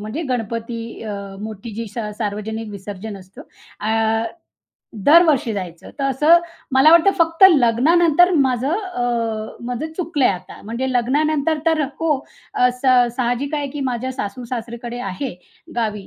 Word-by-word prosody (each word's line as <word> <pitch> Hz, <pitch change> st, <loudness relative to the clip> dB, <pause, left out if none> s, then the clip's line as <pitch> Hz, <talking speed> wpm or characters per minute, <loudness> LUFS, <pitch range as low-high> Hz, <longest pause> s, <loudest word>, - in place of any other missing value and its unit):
म्हणजे 215 Hz, +10 st, -4 dB
गणपती 230 Hz, 0 st, -3 dB, 0.2 s
अ, 215 Hz, -2 st, -5 dB, 0.3 s
मोठी 215 Hz, 0 st, -7 dB
जी 230 Hz, 0 st, -4 dB
स -, -, -5 dB, 0.2 s
सार्वजनिक 215 Hz, +1 st, -4 dB
विसर्जन 200 Hz, +1 st, -7 dB
असतं 185 Hz, +1 st, -13 dB, 0.4 s
अ, 225 Hz, +1 st, +1 dB, 0.8 s
दरवर्षी 305 Hz, -7 st, +5 dB
जायचं. 175 Hz, -4 st, -7 dB
तर 275 Hz, -, -1 dB
असं 295 Hz, +6 st, +5 dB, 0.3 s
मला 265 Hz, +4 st, +6 dB
वाटतं 340 Hz, +3 st, +6 dB
फक्त 330 Hz, +2 st, +4 dB
लग्नानंतर 320 Hz, +6 st, +4 dB
माझं 265 Hz, -1 st, +1 dB
अ, 370 Hz, -, -4 dB, 0.6 s
माझं 250 Hz, +6 st, -4 dB
चुकलंय 320 Hz, -6 st, +1 dB
आता. 180 Hz, -2 st, -5 dB
म्हणजे 235 Hz, +5 st, -3 dB
लग्नानंतर 295 Hz, +5 st, +1 dB
तर 320 Hz, -2 st, +3 dB, 0.2 s
हो, 325 Hz, -2 st, +2 dB, 0.4 s
असं, 250 Hz, 0 st, +3 dB
स 235 Hz, -, -10 dB
साहजिक 255 Hz, +4 st, -1 dB
आहे 290 Hz, -2 st, -2 dB
की 290 Hz, 0 st, -6 dB
माझ्या 250 Hz, +2 st, -3 dB
सासू-सासरीकडे 240 Hz, +1 st, -5 dB
आहे 215 Hz, +7 st, -5 dB, 0.4 s
गावी 210 Hz, -4 st, -2 dB
245 Hz, 135 wpm, -20 LUFS, 220-295 Hz, 0.8 s, मला